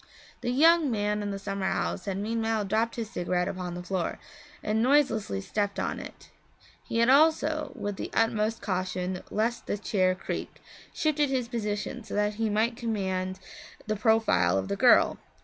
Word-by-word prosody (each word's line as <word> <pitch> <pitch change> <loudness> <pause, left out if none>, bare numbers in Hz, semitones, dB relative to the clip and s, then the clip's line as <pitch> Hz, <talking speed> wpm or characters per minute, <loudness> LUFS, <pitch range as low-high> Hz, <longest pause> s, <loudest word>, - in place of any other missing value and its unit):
The - - -2
young 320 +4 +5
man 210 -2 0
in 205 - -3
the 200 - -3
summer 195 -1 -3
house 195 - -2
had 195 -2 -2
meanwhile 225 0 -1
dropped 220 +4 0
his 225 -2 -5
cigarette 180 -1 -1
upon 180 -2 -4
the 175 - -6
floor 180 -2 -2 0.5
and 215 +1 +1
noiselessly 240 - +2
stepped 200 - -2
on - - -2
it. - - -11 0.5
He - - -4
had 235 +1 +4
also 305 0 +3
with 205 -1 -4
the - - -4
utmost 225 -1 +1
caution 185 -1 -2
lest 230 +3 -1
the - - -1
chair 185 -3 +1
creak - - -5 0.3
shifted 300 -2 +1
his 255 -3 -1
position 225 +1 -3
so - - -7
that 210 0 +1
he 220 - +2
might 220 +3 +1
command 190 -5 -2 0.5
the 215 - -1
profile 210 - +3
of 95 0 -2
the - - 0
girl. - - +5
210 Hz, 170 wpm, -28 LUFS, 190-235 Hz, 0.5 s, young